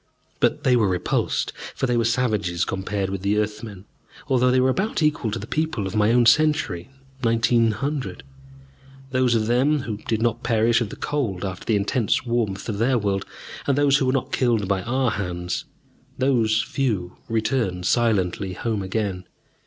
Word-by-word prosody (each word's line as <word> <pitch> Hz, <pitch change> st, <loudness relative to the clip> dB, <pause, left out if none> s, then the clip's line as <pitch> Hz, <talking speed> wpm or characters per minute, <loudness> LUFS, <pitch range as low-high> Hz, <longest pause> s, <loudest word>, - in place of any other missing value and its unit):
But -, -, +1 dB
they 125 Hz, -, +4 dB
were 110 Hz, -4 st, +3 dB
repulsed, 90 Hz, -1 st, -1 dB, 0.2 s
for -, -, -1 dB
they 125 Hz, -1 st, +1 dB
were 115 Hz, -1 st, +2 dB
savages 105 Hz, -7 st, 0 dB
compared 95 Hz, 0 st, -2 dB
with 100 Hz, -1 st, -4 dB
the 100 Hz, +2 st, +1 dB
Earthmen, 105 Hz, -2 st, -4 dB, 0.4 s
although 125 Hz, -2 st, +3 dB
they 130 Hz, +1 st, +3 dB
were 130 Hz, +1 st, +3 dB
about 190 Hz, -, -1 dB
equal 150 Hz, -7 st, +1 dB
to 105 Hz, -, -3 dB
the -, -, -6 dB
people 155 Hz, -10 st, -2 dB
of 95 Hz, -, -4 dB
my 105 Hz, +1 st, +3 dB
own 120 Hz, 0 st, +4 dB
century, 120 Hz, -, +2 dB, 0.3 s
1900. 115 Hz, +3 st, +1 dB, 0.9 s
Those 130 Hz, -2 st, +2 dB
of 110 Hz, -1 st, +1 dB
them 135 Hz, +6 st, +2 dB
who 110 Hz, -6 st, -4 dB
did 110 Hz, +1 st, -2 dB
not 115 Hz, 0 st, 0 dB
perish 115 Hz, 0 st, +2 dB
of 115 Hz, -, -2 dB
the -, -, -8 dB
cold 110 Hz, -11 st, -2 dB
after 95 Hz, -2 st, -6 dB
the 110 Hz, -, +2 dB
intense 105 Hz, +5 st, 0 dB
warmth 115 Hz, -5 st, -1 dB
of 105 Hz, -3 st, -3 dB
their 125 Hz, +2 st, +3 dB
world, 100 Hz, -3 st, -1 dB, 0.4 s
and 140 Hz, -1 st, +2 dB
those 145 Hz, -1 st, +4 dB
who 135 Hz, -, 0 dB
were -, -, +3 dB
not 135 Hz, -1 st, -1 dB
killed 115 Hz, -6 st, +1 dB
by 95 Hz, -1 st, 0 dB
our 125 Hz, +1 st, 0 dB
hands, 90 Hz, -2 st, -3 dB, 0.5 s
those 115 Hz, -5 st, +2 dB
few 105 Hz, -10 st, -2 dB
returned 110 Hz, -5 st, -1 dB
silently 100 Hz, -5 st, +1 dB
home 110 Hz, +2 st, -2 dB
again. 95 Hz, -2 st, -3 dB
115 Hz, 175 wpm, -23 LUFS, 100-125 Hz, 0.9 s, they